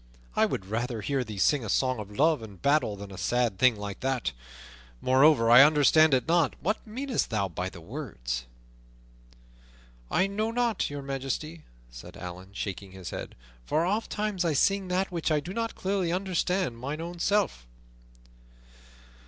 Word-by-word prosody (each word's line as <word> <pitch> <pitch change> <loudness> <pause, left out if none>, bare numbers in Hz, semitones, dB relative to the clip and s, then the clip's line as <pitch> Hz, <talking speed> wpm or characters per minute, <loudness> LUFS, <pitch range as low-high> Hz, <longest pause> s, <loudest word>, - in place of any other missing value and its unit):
I - - +4
would 95 - -4
rather 115 +3 -3
hear 135 +4 -1
thee 105 -4 -8
sing 140 +7 +3
a 110 - -5
song 130 +1 +1
of 105 -2 -7
love 155 -2 +3
and 100 -4 -10
battle 140 - +2
than 100 0 -9
a 95 - -8
sad 120 -5 0
thing 130 -3 +5
like 105 -1 -6
that. 130 - -1 0.7
Moreover, 130 -2 +4
I 120 +2 +10
understand 150 +1 +6
it 130 - -1
not; 165 -4 +2
what 210 +8 0
meanest 255 +3 -2
thou 110 -4 0
by 90 +1 -4
the 85 - -12
words?" - - -5 1.6
"I - - +2
know 210 +3 -1
not, 235 -2 0
Your 145 -1 -6
Majesty," 140 +4 -4 0.3
said 85 +11 -11
Allan, 90 +1 -8
shaking 100 -1 -5
his 95 -2 -8
head, - - -6 0.3
"for 155 - +1
ofttimes 210 -1 -1
I 165 -3 +1
sing 195 +7 +2
that 185 +1 0
which 170 -2 -1
I 155 -1 +2
do 175 +6 -7
not 230 +1 -2
clearly 190 -3 -1
understand 180 -6 -1
mine 140 +5 -4
own 170 +1 -6
self." 190 - 0
140 Hz, 165 wpm, -28 LUFS, -, 1.6 s, I